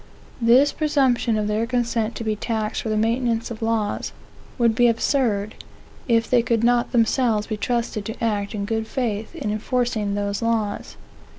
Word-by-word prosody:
This 250 +5 +5
presumption 265 -7 +1
of 210 -1 -1
their 215 +2 0
consent 235 -2 -1
to - - -5
be 215 -1 -1
taxed 215 0 -2
for 225 - -4
the 215 - 0
maintenance 230 +1 0
of 230 - -7
laws, 225 -2 -1 0.4
would 235 -3 +3
be 240 +2 +4
absurd, 230 -3 +1 0.5
if 230 -2 +2
they 245 -2 +4
could 230 -1 0
not 240 0 +2
themselves 230 -2 +2
be 215 - -3
trusted 230 -1 -2
to 225 +2 -6
act 210 -1 -1
in 200 -1 -2
good 220 +1 -2
faith 225 -4 -3
in 210 - -3
enforcing 215 -2 -1
those 200 +1 -2
laws. 225 -3 -2
230 Hz, 170 wpm, -23 LUFS, 215-240 Hz, 0.5 s, This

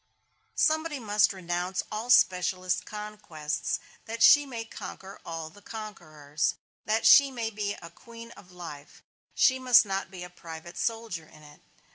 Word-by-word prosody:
Somebody 315 -1 +1
must 210 -2 +3
renounce 180 0 -3
all 215 +3 -4
specialist 185 -4 +3
conquests, 210 -8 -4 0.3
that 230 0 -2
she 290 -1 +7
may 230 -4 -5
conquer 195 -3 -9
all 165 -1 -6
the 205 - -17
conquerors. 155 -10 -4 0.3
That 220 +1 0
she 280 -2 +8
may 230 -4 -4
be 205 -1 -3
a 170 - -11
queen 230 +5 -12
of 185 -5 -15
life, 160 -5 -10 0.3
she 260 -1 +4
must 250 -2 +6
not 195 -1 -3
be 180 -2 -8
a 180 - -8
private 170 -1 -10
soldier 225 -8 -3
in 155 -1 -17
it. 150 0 -16
205 Hz, 150 wpm, -28 LUFS, 170-230 Hz, 0.3 s, she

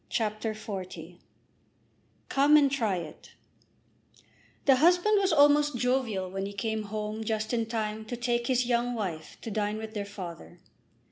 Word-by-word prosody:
CHAPTER 215 -1 -1
XL 210 -3 -5 1.5
"Come 285 +2 +5
and 280 -2 +4
Try 225 -8 0
It" 165 -4 -8 1.3
The 270 -2 +6
husband 355 +7 +4
was 385 -1 +2
almost 290 -2 +4
jovial 235 -7 0
when 195 +1 -3
he 200 - -7
came 220 +1 -2
home 215 +1 -4
just 220 +1 -2
in 230 -2 0
time 220 -1 -3
to 245 - -5
take 240 0 -1
his 255 -1 +2
young 240 0 0
wife 170 -8 -5
to 225 - -6
dine 210 0 -1
with 220 0 -7
their 205 -2 -3
father. 180 -3 -9
220 Hz, 150 wpm, -28 LUFS, 210-255 Hz, 1.5 s, The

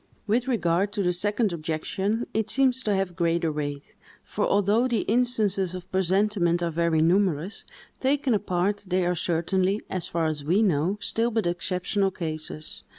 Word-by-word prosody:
With 230 +4 +1
regard 195 -5 +1
to 205 - -1
the 180 -1 +2
second 205 +2 +1
objection, 170 +8 -2
it 220 -1 -1
seems 260 -1 +2
to 210 -4 0
have 190 -2 -1
greater 170 -2 +1
weight; 145 -1 -5 0.3
for - - -2
although 205 +5 +3
the 235 -5 0
instances 210 -6 +1
of 180 -1 -9
presentiment 190 -2 +1
are 170 - 0
very 165 -1 +2
numerous, 180 0 +1 0.3
taken 270 -1 +1
apart, 200 0 -1
they 185 0 +1
are 175 - +1
certainly, 185 +4 0
as 185 -3 -3
far 165 -1 -1
as 155 -2 -2
we 180 +9 +2
know, 180 +1 +1
still 230 +1 0
but 225 -3 -1
exceptional 180 +3 0
cases. 155 -3 -5
185 Hz, 160 wpm, -26 LUFS, 170-210 Hz, 0.3 s, although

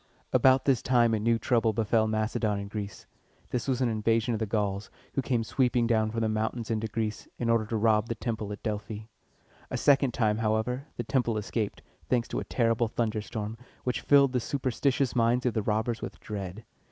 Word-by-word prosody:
About 130 0 +5
this 135 -4 +3
time 120 -3 +3
a 110 - +1
new 115 +2 +2
trouble 115 -2 +2
befell 110 +1 +2
Macedon 110 -1 0
and 100 0 -6
Greece. 100 -3 -6 0.5
This 125 +1 -2
was 130 -1 0
an 125 - +3
invasion 115 +2 +1
of 110 - -1
the 110 - -1
Gauls, 100 -1 -1 0.2
who 135 - +1
came 125 -3 0
sweeping 125 0 +1
down 110 -2 +2
from 115 +1 -2
the 110 - +2
mountains 110 +2 -2
into 110 0 -1
Greece, 110 0 -3
in 115 -1 +1
order 115 -2 +2
to 115 - -1
rob 110 0 +3
the 115 - -1
temple 110 -4 -3
at 105 - -7
Delphi. 105 -1 -3 0.7
A - - -2
second 140 -2 +4
time, 110 -2 +2
however, 115 +5 0
the 120 - -2
temple 120 -2 0
escaped, 105 0 -3 0.3
thanks 120 -2 +2
to - - -2
a - - -3
terrible 115 -1 +1
thunderstorm, 110 -1 -3 0.2
which 125 - -1
filled 140 -2 +5
the 125 - +2
superstitious 135 +1 0
minds 120 +1 +2
of 125 - +2
the 110 - 0
robbers 110 +2 -1
with - - -6
dread. 100 +1 -6
115 Hz, 200 wpm, -28 LUFS, 110-120 Hz, 0.7 s, About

